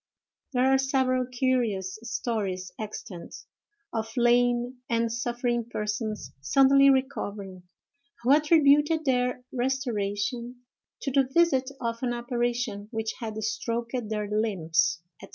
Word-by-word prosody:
There 250 0 +3
are 265 0 +4
several 260 -2 +1
curious 240 -7 0
stories 200 -6 -3
extant, 205 -5 -7 0.6
of 225 -1 -2
lame 245 +1 +2
and 230 -1 +1
suffering 240 0 -1
persons 210 0 -3
suddenly 275 - +5
recovering, 200 -9 -2 0.5
who 250 - +3
attributed 300 +1 +4
their 250 -1 +1
restoration 245 -2 -2 0.4
to 275 - -1
the 265 -1 +2
visit 275 -5 +3
of 230 -1 -3
an 245 -2 0
apparition 240 -3 -2
which 225 -1 -3
had 220 -2 -5
stroked 235 +2 -2
their 210 -1 -2
limbs, 170 -6 +1 0.2
&c. - - -10
240 Hz, 115 wpm, -27 LUFS, 215-260 Hz, 0.6 s, suddenly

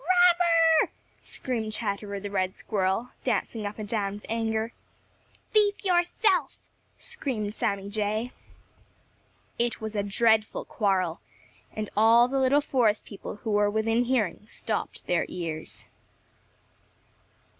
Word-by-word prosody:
"Robber!" 340 -1 +4 0.3
screamed 225 -4 -4
Chatterer 200 -2 -3
the 200 0 -6
Red 185 -2 0
Squirrel, 200 +3 -1
dancing 225 -4 -1
up 205 - -7
and 215 -1 -5
down 205 -2 -1
with 205 - -9
anger. 225 0 -1 0.8
"Thief 410 -1 +2
yourself!" 350 -3 +2 0.4
screamed 245 - -3
Sammy 200 -2 -1
Jay. 215 +3 -1 1.3
It 240 0 0
was 220 0 -5
a 205 - +1
dreadful 215 +2 +2
quarrel, 185 -5 0 0.5
and 215 -1 -5
all 225 +3 +6
the 270 +1 0
little 265 +2 +4
forest 235 -7 +1
people 200 - -8
who 225 - -2
were 205 0 +3
within 225 +3 +1
hearing 215 -6 0
stopped - - -4
their 175 -1 +1
ears. 165 -3 -5
220 Hz, 120 wpm, -27 LUFS, 205-260 Hz, 1.3 s, all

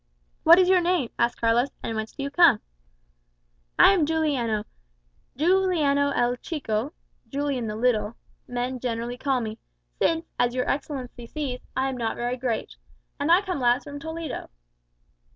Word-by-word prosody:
"What 335 +2 +8
is 370 -1 +5
your 370 -1 +5
name?" 345 -8 0
asked 235 0 +1
Carlos; 235 +3 +2
"and 225 - -3
whence 220 0 -3
do 275 - -5
you 280 - -3
come?" 310 -8 +6 1.2
"I 395 - +8
am 330 -6 +2
Juliano; 275 -10 0 0.7
Juliano 315 -4 +2
el 245 +1 +1
Chico 265 -3 -3 0.4
(Julian 275 -4 -2
the 210 - -4
Little) 225 -1 +1 0.3
men 250 +1 -3
generally 240 0 -3
call 265 -2 0
me 220 -1 -5 0.4
since, 330 0 +2
as 245 0 +2
your 255 - 0
Excellency 260 -4 -4
sees, 270 -3 -4 0.2
I 265 +1 +1
am 265 -1 -3
not 230 -2 -2
very 240 +1 -2
great. 245 -3 -3 0.4
And 290 +3 +1
I 360 +4 +6
come 365 -6 -3
last 245 +1 +2
from 285 0 -8
Toledo." 320 -1 -6
265 Hz, 155 wpm, -25 LUFS, 240-310 Hz, 1.2 s, What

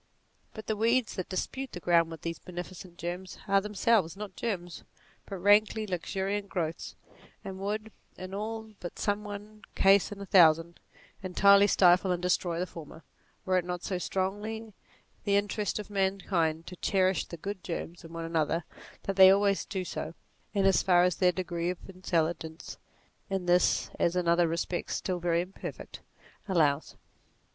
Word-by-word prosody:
But 220 - -8
the 220 - -1
weeds 230 +2 +2
that 185 - -5
dispute 260 +8 -4
the 175 - -5
ground 170 -1 +3
with 165 -2 -9
these 165 0 -4
beneficent 180 0 -8
germs, 180 +2 -5
are 195 0 +4
themselves 205 -3 +1
not 205 -3 -7
germs 175 -7 -4 0.4
but 195 - -5
rankly 210 +3 +4
luxuriant 195 +2 -3
growths, 165 -2 -3 0.5
and 190 -1 -6
would, 215 +2 -3 0.3
in 185 +1 -8
all 220 +2 -5
but 175 - -7
some 205 0 -1
one 210 +1 -8
case 195 +1 +5
in 205 - -7
a 200 - -6
thousand, 170 -2 +5 0.4
entirely 200 +2 +5
stifle 185 -1 +5
and 180 - 0
destroy 175 -1 0
the 180 - -1
former, 165 -2 -11 0.4
were 185 -1 +3
it - - -4
not 180 0 -5
so 185 -2 -2
strongly 210 +4 -3 0.5
the 200 -1 +2
interest 205 0 0
of 210 -1 -7
man 195 -1 +1
kind 165 -4 0
to 180 - -8
cherish 185 0 +1
the 170 - -9
good 195 +3 -6
germs 170 0 -5
in 165 - -11
one 165 0 -5
another, 165 0 0 0.4
that 195 -1 -3
they 190 -1 +10
always 200 0 +3
do 190 -3 -4
so, 165 -1 -5 0.4
in 200 -2 +1
as 195 -1 +4
far 180 -1 +4
as 180 -1 +1
their 180 -1 +4
degree 175 -1 -3
of 180 - -2
intelligence 170 -3 -3 0.5
(in 190 -2 -2
this 180 0 +3
as 170 - +2
in 180 -1 0
other 170 0 +4
respects 170 +2 -2
still 180 -2 -2
very 170 -1 +1
imperfect) 180 +2 -8 0.5
allows. 155 -6 +1
185 Hz, 170 wpm, -29 LUFS, 175-200 Hz, 0.5 s, they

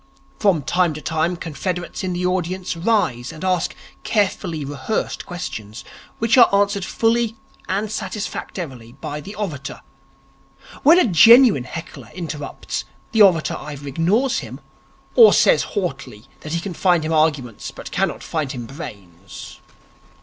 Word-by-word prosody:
From 185 -8 +2
time 175 +1 +1
to - - -6
time 160 +4 0
confederates 175 +3 -4
in 185 -1 -2
the 180 +1 -2
audience 180 0 -1
rise 165 - 0
and 155 - -10
ask 185 -2 0 0.3
carefully 185 -7 -1
rehearsed 145 +9 -3
questions, 110 - -7 0.3
and 230 +2 +2
are - - +8
answered 200 -1 +1
fully 225 +2 +1 0.3
and 205 +3 -1
satisfactorily 180 - -5
by 145 +2 -6
the 200 +8 -9
orator. 160 -10 -5 1.0
When 325 +4 +7
a 365 - +5
genuine 225 - +7
heckler 165 +5 -8
interrupts, 155 -5 -5 0.3
the 225 - +3
orator 180 -6 +5
either 145 -1 -8
ignores 195 - +1
him, - - -8 0.5
or 455 -2 +8
says - - +5 0.2
haughtily 135 - -4
that 155 - -7
he 170 - 0
can 180 +1 -5
find 175 -2 +2
him 160 - -1
arguments 150 -8 0
but - - -10
cannot - - -1
find 155 -5 -3
him 120 -3 -6
brains. 100 - -10
170 Hz, 140 wpm, -21 LUFS, 145-200 Hz, 1.0 s, are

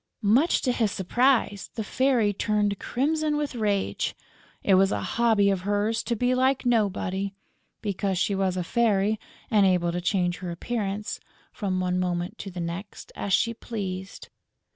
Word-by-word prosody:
Much 245 +11 +3
to 255 - +2
his 225 -4 +1
surprise, 225 +1 +1
the 220 - -2
Fairy 240 -2 +2
turned 205 0 0
crimson 300 +3 0
with 295 -2 -2
rage. 210 -4 -1 0.5
It 195 - +3
was 195 +1 +5
a - - -1
hobby 220 -4 +3
of 190 -2 -1
hers 205 +3 0
to 235 - 0
be 245 +3 +1
like 260 +1 +2
nobody, 200 -4 0 0.5
because 200 -2 -1
she 200 - +1
was 190 -1 0
a 180 - 0
fairy 215 0 +2 0.3
and 210 -2 +5
able 180 -2 +3
to 175 +1 -3
change 180 -1 0
her 180 -2 -5
appearance, 205 +3 -3 0.3
from 190 -4 -2
one 180 0 0
moment 180 +1 -2
to 200 - -6
the 180 -1 -7
next, 170 +4 -6
as 200 - -4
she 230 +5 +3
pleased. 195 -5 -6
205 Hz, 165 wpm, -26 LUFS, 190-230 Hz, 0.5 s, was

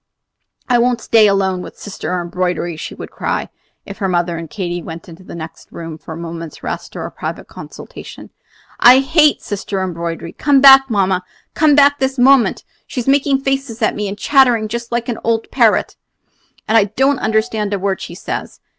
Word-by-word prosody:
"I 245 -2 +3
won't 245 0 +1
stay 225 -1 +4
here 205 - +4
alone 190 -2 0
with - - -10
Sister 180 -3 -5
Embroidery," 175 -1 -2
she 155 - -7
would - - -9
cry, - - -3 0.4
if 200 - -10
her 195 - 0
mother 175 -1 0
and 165 -1 -7
Katy 175 -2 -4
went 165 0 -9
into 170 +1 -13
the - - -10
next 160 -1 -10
room 165 -2 -8
for - - -11
a - - -8
moment's 165 -1 -8
rest - - -6
or - - -5
a - - -7
private - - -6
consultation; - - -11 0.5
"I 250 +2 +8
hate 300 +2 +3
Sister 200 -1 -4
Embroidery! 170 -2 -4
Come 285 -2 +2
back, 270 0 +8
mamma, 190 -4 +1 0.3
come 305 -2 +3
back 285 0 +5
this 265 +1 -1
moment! 260 0 +4 0.2
She's 250 -1 -5
making 275 0 +2
faces 270 -4 -2
at - - +2
me, 210 0 -3
and 200 +1 -5
chattering 245 -6 +3
just 235 +1 -5
like 235 0 -2
an 240 - -3
old 225 0 -1
parrot, - - +2 0.7
and 220 - +1
I 205 - +3
don't 265 +7 +1
understand 220 -1 -1
a 200 - 0
word 195 0 -2
she 170 - -8
says. - - -6
210 Hz, 190 wpm, -17 LUFS, 180-260 Hz, 0.7 s, I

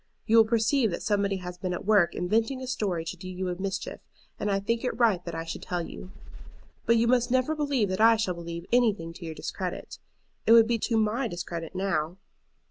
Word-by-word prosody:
You 225 +1 +4
will 225 - +8
perceive 225 +2 +2
that 170 - -4
somebody 200 -2 +1
has 180 -1 -7
been 185 -1 -2
at - - -7
work 205 -5 +4
inventing 225 +8 0
a 260 - -6
story 200 -10 -2
to 170 - -5
do 185 +1 -9
you 185 0 -3
a 180 +1 -4
mischief, 195 0 -4 0.4
and 210 - -1
I 195 -1 +1
think 230 +4 -1
it 250 -3 -2
right 220 -7 +3
that 170 -1 -5
I 165 - -3
should 165 - -6
tell 175 -2 -3
you. 185 - -10 0.8
"But 230 +1 +5
you 230 - +3
must 245 0 +3
never 260 +4 +2
believe 285 -9 0
that 185 +3 -1
I 225 +1 +7
shall 215 -5 -1
believe 170 0 -7
anything 210 -9 +2
to 170 - -10
your 160 -1 -6
discredit. - - -5 0.5
It 225 - +7
would 230 -1 +8
be 230 0 0
to 225 +1 0
my 220 +4 +1
discredit 170 -3 -6
now. 185 -3 -1
200 Hz, 220 wpm, -27 LUFS, 180-230 Hz, 0.8 s, will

